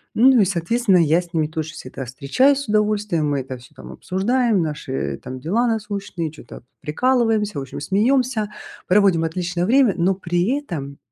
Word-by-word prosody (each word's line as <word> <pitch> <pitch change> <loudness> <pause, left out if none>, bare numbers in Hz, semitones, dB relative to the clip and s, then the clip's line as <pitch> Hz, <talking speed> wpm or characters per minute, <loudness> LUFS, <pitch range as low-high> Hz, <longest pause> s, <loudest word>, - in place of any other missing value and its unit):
Ну, 250 +1 +6
и, - - +4
соответственно, 195 +3 +1
я 165 0 +3
с 175 -1 -15
ними 160 -3 +1
тоже 155 0 -5
всегда 135 -3 -8
встречаюсь 145 - +2
с 280 - -6
удовольствием, 210 -7 +1
мы 140 -2 0
это 130 0 -7
всё 125 +1 -18
там 65 -1 -11
обсуждаем, 210 - 0
наши 150 -3 -4
там 130 0 -7
дела 210 - 0
насущные, 200 -7 -3
чё-то 135 -6 -12 0.2
прикалываемся, 220 - +1
в - - -4
общем, 135 - -7
смеемся, 220 - +1 0.4
проводим 185 -3 +4
отличное 175 +1 -2
время, 250 0 +4
но 185 +2 +1
при 180 +7 0
этом, 145 - -6
185 Hz, 165 wpm, -21 LUFS, 155-220 Hz, 0.4 s, Ну